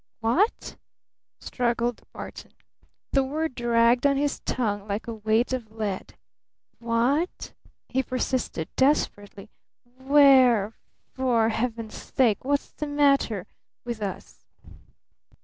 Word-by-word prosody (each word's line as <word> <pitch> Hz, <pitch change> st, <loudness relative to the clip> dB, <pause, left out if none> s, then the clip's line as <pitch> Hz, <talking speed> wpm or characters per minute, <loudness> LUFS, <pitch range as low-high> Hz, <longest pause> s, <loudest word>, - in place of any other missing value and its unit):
"Wha 235 Hz, -, +3 dB
ght?" -, -, -12 dB, 0.6 s
struggled 240 Hz, -1 st, -1 dB
Barton. -, -, -9 dB, 0.6 s
The 275 Hz, -, +3 dB
word 310 Hz, +3 st, -2 dB
dragged 240 Hz, +2 st, +3 dB
on 275 Hz, -1 st, +2 dB
his 290 Hz, 0 st, -1 dB
tongue 205 Hz, -5 st, -2 dB
like 205 Hz, +1 st, -3 dB
a 230 Hz, -, -5 dB
weight 220 Hz, +3 st, 0 dB
of 240 Hz, -4 st, -4 dB
lead. 215 Hz, -4 st, -4 dB, 0.6 s
"Wha 235 Hz, +5 st, +2 dB
ght?" -, -, -12 dB, 0.3 s
he 265 Hz, -, 0 dB
persisted 255 Hz, -9 st, -3 dB
desperately. 205 Hz, -7 st, 0 dB, 0.5 s
"Wh 275 Hz, +2 st, -2 dB
ere? 250 Hz, -7 st, +6 dB, 0.4 s
For 240 Hz, -4 st, +2 dB
Heaven's 225 Hz, -1 st, -3 dB
sake 230 Hz, -6 st, 0 dB
wha 285 Hz, +2 st, +2 dB
ght's 280 Hz, -, -5 dB
the 300 Hz, -, -5 dB
matter 275 Hz, -9 st, +2 dB, 0.4 s
with 235 Hz, -2 st, -5 dB
us?" 200 Hz, -2 st, -6 dB
240 Hz, 120 wpm, -25 LUFS, 220-270 Hz, 0.6 s, ere